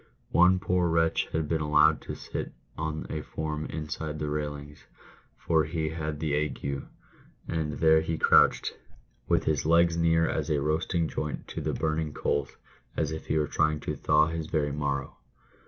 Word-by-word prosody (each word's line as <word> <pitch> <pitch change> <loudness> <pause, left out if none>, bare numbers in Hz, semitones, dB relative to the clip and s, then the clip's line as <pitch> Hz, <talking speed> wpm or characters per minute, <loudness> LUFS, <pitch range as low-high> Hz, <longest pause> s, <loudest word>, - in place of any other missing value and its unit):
One 90 +2 +5
poor 90 -1 +1
wretch 80 0 +2
had 80 -1 -1
been 80 0 0
allowed 75 0 +4
to - - -6
sit - - -6 0.2
on 80 0 -3
a 75 - -3
form 75 0 -4
inside 75 0 -5
the 75 -1 -3
railings, 75 -1 -5 0.5
for 80 -2 +2
he 80 0 -2
had 75 -2 -4
the 75 -2 -1
ague, 70 -2 -2 0.6
and 80 -2 -2
there 80 0 +4
he 80 0 -2
crouched, - - +4 0.5
with - - +2
his 75 -3 0
legs 85 +1 +4
near 80 0 +3
as 75 -2 -2
a 75 -2 +2
roasting 80 +3 0
joint 75 0 -4
to - - -5
the - - -2
burning 80 -1 -1
coals, 70 -1 -2 0.4
as - - 0
if 80 - -6
he 80 - +1
were 75 - +2
trying 75 +1 +1
to - - -3
thaw 75 0 +3
his 80 -1 -4
very 75 -3 0
marrow. 70 -2 -3
80 Hz, 170 wpm, -28 LUFS, 75-80 Hz, 0.6 s, One